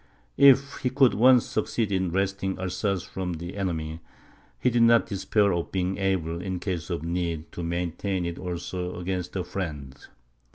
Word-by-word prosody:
If 140 Hz, 0 st, +6 dB
he 125 Hz, -, -1 dB
could 130 Hz, -1 st, +4 dB
once 125 Hz, +1 st, +6 dB
succeed 110 Hz, 0 st, -1 dB
in 95 Hz, -2 st, +1 dB
wresting 95 Hz, +1 st, -1 dB
Alsace 95 Hz, +1 st, -1 dB
from 90 Hz, -2 st, -4 dB
the 85 Hz, +3 st, -6 dB
enemy, 80 Hz, -5 st, -3 dB, 0.6 s
he 125 Hz, -, +2 dB
did 120 Hz, 0 st, +2 dB
not 115 Hz, 0 st, +6 dB
despair 100 Hz, -1 st, +1 dB
of 85 Hz, -1 st, -2 dB
being 95 Hz, +1 st, -1 dB
able, 85 Hz, -4 st, -1 dB
in 95 Hz, 0 st, -3 dB
case 90 Hz, -3 st, -4 dB
of 85 Hz, -3 st, -3 dB
need, 85 Hz, -2 st, -3 dB
to -, -, -6 dB
maintain 90 Hz, +2 st, -2 dB
it 85 Hz, 0 st, -4 dB
also 90 Hz, 0 st, -4 dB
against 90 Hz, 0 st, -3 dB
a 95 Hz, -, -1 dB
friend. 75 Hz, -9 st, -5 dB
95 Hz, 165 wpm, -26 LUFS, 85-100 Hz, 0.6 s, If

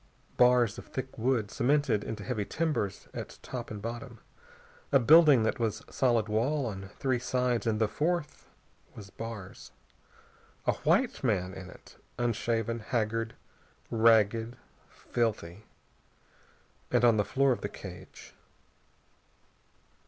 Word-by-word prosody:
Bars 125 Hz, -3 st, +4 dB
of -, -, -11 dB
thick 130 Hz, 0 st, -6 dB
wood, 115 Hz, -3 st, 0 dB
cemented 140 Hz, -5 st, +1 dB
into 110 Hz, -, -5 dB
heavy 115 Hz, -5 st, -2 dB
timbers 150 Hz, -, -2 dB
at -, -, -7 dB
top 120 Hz, -2 st, -6 dB
and 105 Hz, -2 st, -7 dB
bottom. 120 Hz, 0 st, -6 dB, 0.7 s
A 140 Hz, -, +7 dB
building 145 Hz, -1 st, +7 dB
that 110 Hz, -, 0 dB
was 110 Hz, -2 st, -1 dB
solid 120 Hz, -4 st, +2 dB
wall 125 Hz, +7 st, 0 dB
on 95 Hz, -4 st, -6 dB
three 130 Hz, -3 st, 0 dB
sides, 125 Hz, -1 st, 0 dB
and 110 Hz, -1 st, +1 dB
the 110 Hz, -, +3 dB
fourth 160 Hz, +5 st, -2 dB, 0.5 s
was 100 Hz, -3 st, -11 dB
bars. 115 Hz, -5 st, -8 dB, 0.9 s
A -, -, +3 dB
white -, -, +1 dB
man 90 Hz, +1 st, 0 dB
in 95 Hz, -1 st, -9 dB
it, -, -, -16 dB, 0.2 s
unshaven, 115 Hz, -1 st, -1 dB
haggard, 115 Hz, 0 st, -2 dB, 0.6 s
ragged, 115 Hz, 0 st, +3 dB, 0.3 s
filthy. 110 Hz, -4 st, -3 dB, 1.2 s
And 120 Hz, -1 st, +3 dB
on 115 Hz, -2 st, +5 dB
the 105 Hz, -, +3 dB
floor 135 Hz, +6 st, +2 dB
of 120 Hz, -, -1 dB
the -, -, -3 dB
cage.... -, -, -11 dB
115 Hz, 125 wpm, -29 LUFS, 110-125 Hz, 1.2 s, A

